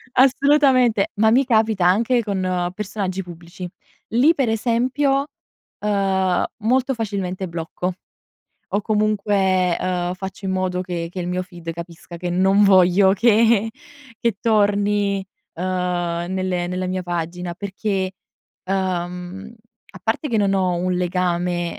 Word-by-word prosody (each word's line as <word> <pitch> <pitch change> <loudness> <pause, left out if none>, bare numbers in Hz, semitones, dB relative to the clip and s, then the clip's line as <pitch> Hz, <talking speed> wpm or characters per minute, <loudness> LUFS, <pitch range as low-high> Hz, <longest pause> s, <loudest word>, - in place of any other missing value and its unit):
Assolutamente, 260 -4 +4
ma 220 +1 +3
mi 260 +3 +4
capita 220 -6 +2
anche 230 +6 +3
con 185 -3 -1
personaggi 195 -2 -3
pubblici. 175 +1 -9 0.4
Lì 260 +9 +4
per 270 -7 0
esempio, 260 +5 +1 0.5
ehm, 195 -3 +1
molto 255 +4 +1
facilmente 195 -5 -3
blocco, 170 +2 -4 0.8
o 205 - 0
comunque, 200 -4 +1
ehm, 180 -1 -1
faccio 190 +1 -8
in 190 - -1
modo 185 -1 -1
che 175 -2 -4
che 185 - -5
il 175 - -3
mio 180 +1 -1
feed 175 -3 -8
capisca 170 0 -9
che 175 +1 -4
non 190 +3 +3
voglio 190 0 +5
che 225 +1 +3 0.5
che 230 -4 0
torni, 205 -2 +2 0.3
ehm, 175 -1 -2
nelle 185 -2 -1
nella 180 +1 -3
mia 185 0 -2
pagina 175 0 -4
perché, 195 0 -3 0.5
uhm, 185 +2 -3 0.4
a - - -13
parte 225 +7 -1
che 230 - 0
non 200 -2 +2
ho 185 -2 +1
un 180 +1 -1
legame, 175 -1 -1
190 Hz, 130 wpm, -21 LUFS, 180-215 Hz, 0.8 s, voglio